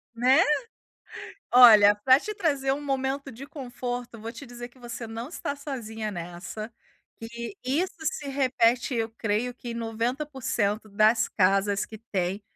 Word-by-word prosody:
Né. 255 Hz, +3 st, +5 dB, 1.1 s
Olha, 215 Hz, -5 st, +9 dB
pra 260 Hz, +7 st, +4 dB
te 425 Hz, -, -5 dB
trazer 280 Hz, -8 st, 0 dB
um 290 Hz, +2 st, -3 dB
momento 270 Hz, 0 st, -2 dB
de 265 Hz, +5 st, -9 dB
conforto, 245 Hz, -4 st, -6 dB
vou 225 Hz, +1 st, -5 dB
te 245 Hz, +4 st, -10 dB
dizer 240 Hz, -1 st, -9 dB
que 255 Hz, -, -23 dB
você 235 Hz, -1 st, -7 dB
não 230 Hz, +4 st, -6 dB
está 285 Hz, -4 st, -4 dB
sozinha 225 Hz, -7 st, -5 dB
nessa, 175 Hz, +5 st, -7 dB, 0.5 s
que 235 Hz, -, -7 dB
isso 310 Hz, +9 st, 0 dB
se 295 Hz, -2 st, -3 dB
repete 255 Hz, -2 st, +1 dB
eu 225 Hz, -1 st, 0 dB
creio 225 Hz, +3 st, -1 dB
que 240 Hz, -1 st, -8 dB
em -, -, -4 dB
90% 230 Hz, -2 st, -2 dB
das 215 Hz, +3 st, +4 dB
casas 195 Hz, +1 st, +2 dB
que 220 Hz, -, -10 dB, 0.2 s
têm 190 Hz, +2 st, -1 dB
240 Hz, 150 wpm, -26 LUFS, 220-270 Hz, 1.1 s, Olha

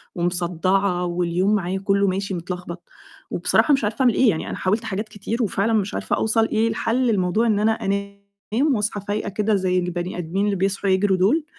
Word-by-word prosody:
ومصدّعة 180 Hz, +1 st, 0 dB
واليوم 175 Hz, +3 st, +1 dB
معايا 190 Hz, -1 st, -2 dB
كُلُّه 200 Hz, 0 st, +1 dB
ماشي 195 Hz, +1 st, -2 dB
متلخبط، 180 Hz, 0 st, -6 dB, 0.5 s
وبصراحة 300 Hz, -, +2 dB
مش 270 Hz, -, +1 dB
عارفة 210 Hz, +4 st, -1 dB
أعمل 245 Hz, -3 st, +4 dB
إيه، 255 Hz, +1 st, +4 dB
يعني 160 Hz, -, -2 dB
أنا -, -, -4 dB
حاولت 210 Hz, +5 st, 0 dB
حاجات 215 Hz, 0 st, -4 dB
كتير 215 Hz, +3 st, -3 dB
وفعلاً 210 Hz, +2 st, 0 dB
مش 205 Hz, -2 st, 0 dB
عارفة -, -, -1 dB
أوصل 220 Hz, 0 st, +1 dB
إيه 220 Hz, +1 st, +1 dB
الحَلّ 230 Hz, +3 st, 0 dB
لموضوع 200 Hz, +4 st, +1 dB
إن 210 Hz, -2 st, +2 dB
أنا 215 Hz, +1 st, +3 dB
أنام 200 Hz, +6 st, -2 dB
وأصحى 210 Hz, -1 st, -2 dB
فايقة 205 Hz, +1 st, -2 dB
كده 210 Hz, +2 st, 0 dB
زي 185 Hz, -1 st, +1 dB
البني 180 Hz, 0 st, -3 dB
آدمين 180 Hz, +4 st, -1 dB
اللي 205 Hz, -1 st, +1 dB
بيصحوا 195 Hz, +1 st, -1 dB
يجروا 190 Hz, 0 st, +2 dB
دول، 270 Hz, -, +2 dB
200 Hz, 185 wpm, -22 LUFS, 185-215 Hz, 0.5 s, أعمل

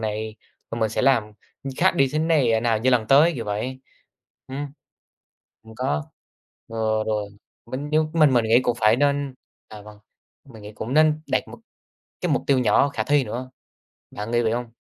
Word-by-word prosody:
này. 110 Hz, 0 st, -4 dB, 0.3 s
Rồi 115 Hz, -, -4 dB
mình 110 Hz, -, +2 dB
sẽ -, -, -1 dB
làm, 130 Hz, -3 st, +4 dB, 0.4 s
ừm, 135 Hz, -, -5 dB
khác -, -, +3 dB
đi 135 Hz, -1 st, +3 dB
thế 155 Hz, -, 0 dB
này 155 Hz, -7 st, +2 dB
ờ, 110 Hz, -, +2 dB
nào 115 Hz, -2 st, +1 dB
như 130 Hz, +3 st, +2 dB
lần 115 Hz, -3 st, +2 dB
tới, 150 Hz, +7 st, +5 dB
kiểu 115 Hz, -, -5 dB
vậy. 110 Hz, +6 st, -4 dB, 0.7 s
Ừm, 140 Hz, +2 st, -4 dB, 1.0 s
đừng 110 Hz, 0 st, -14 dB
có 75 Hz, -, -1 dB, 0.6 s
ờ, 110 Hz, -1 st, -1 dB
rồi, 105 Hz, -2 st, -2 dB, 0.4 s
mình 135 Hz, +5 st, -5 dB
như 155 Hz, +1 st, +3 dB
mình 155 Hz, -5 st, +4 dB
mình 120 Hz, -2 st, +3 dB
nghĩ 115 Hz, +3 st, +5 dB
cũng 120 Hz, -, 0 dB
phải 110 Hz, +1 st, +4 dB
nên 140 Hz, 0 st, 0 dB, 0.3 s
à, 105 Hz, -1 st, -11 dB
vâng, 105 Hz, 0 st, -14 dB, 0.5 s
mình 115 Hz, -5 st, -14 dB
nghĩ 105 Hz, 0 st, -9 dB
cũng 115 Hz, +4 st, -5 dB
nên 155 Hz, 0 st, +4 dB
đặt -, -, 0 dB
một -, -, -11 dB, 0.6 s
cái -, -, 0 dB
mục -, -, 0 dB
tiêu 135 Hz, -2 st, +3 dB
nhỏ 125 Hz, +4 st, +3 dB
khả 110 Hz, -6 st, -3 dB
thi 145 Hz, +2 st, +2 dB
nữa. 125 Hz, +3 st, -6 dB, 0.6 s
Bạn 105 Hz, +2 st, -6 dB
nghĩ 120 Hz, 0 st, +2 dB
vậy 110 Hz, -, +1 dB
hông? 120 Hz, -1 st, -4 dB
120 Hz, 200 wpm, -23 LUFS, 110-140 Hz, 1.0 s, tới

